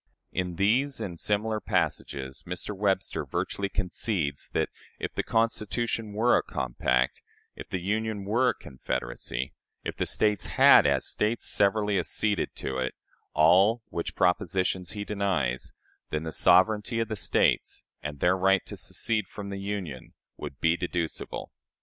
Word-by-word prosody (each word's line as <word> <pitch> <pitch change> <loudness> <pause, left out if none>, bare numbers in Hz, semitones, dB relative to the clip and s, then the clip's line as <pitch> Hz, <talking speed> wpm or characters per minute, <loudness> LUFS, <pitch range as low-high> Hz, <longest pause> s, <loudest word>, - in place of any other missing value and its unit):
" - - -51
In 90 -1 -5
these 125 +9 +2
and 85 -4 -5
similar 110 +1 0
passages, 65 -9 -2
Mr. 90 +4 -3
Webster 95 -5 0
virtually 100 +8 -2
concedes 90 -6 -2
that, - - 0 0.3
if - - -4
the - - 0
Constitution 115 0 -1
were 115 +4 +4
a - - +3
compact; 60 0 -1 0.3
if - - -9
the 95 - -2
Union 105 +2 -2
were 120 +5 +3
a - - -1
confederacy; 65 -1 -4 0.3
if - - -4
the - - -1
States 105 -2 +2
had, - - +7
as - - +2
States, 110 +2 0
severally 105 0 +3
acceded 105 +3 0
to 65 -1 -3
it 65 0 -2 0.4
all 95 +9 +5
which 85 - -4
propositions 90 0 +1
he 105 -1 -4
denies 95 -12 -1 0.4
then 75 0 -2
the 80 - -4
sovereignty 105 +8 +4
of 115 - 0
the 110 - -3
States - - +1 0.2
and 75 -1 -6
their 90 +1 +4
right 95 0 +3
to - - -7
secede 110 -4 0
from 100 +1 -7
the 100 0 -5
Union 100 -10 -5 0.2
would 65 - -8
be 80 +1 +3
deducible. 85 -2 -4
95 Hz, 150 wpm, -28 LUFS, 80-105 Hz, 0.4 s, had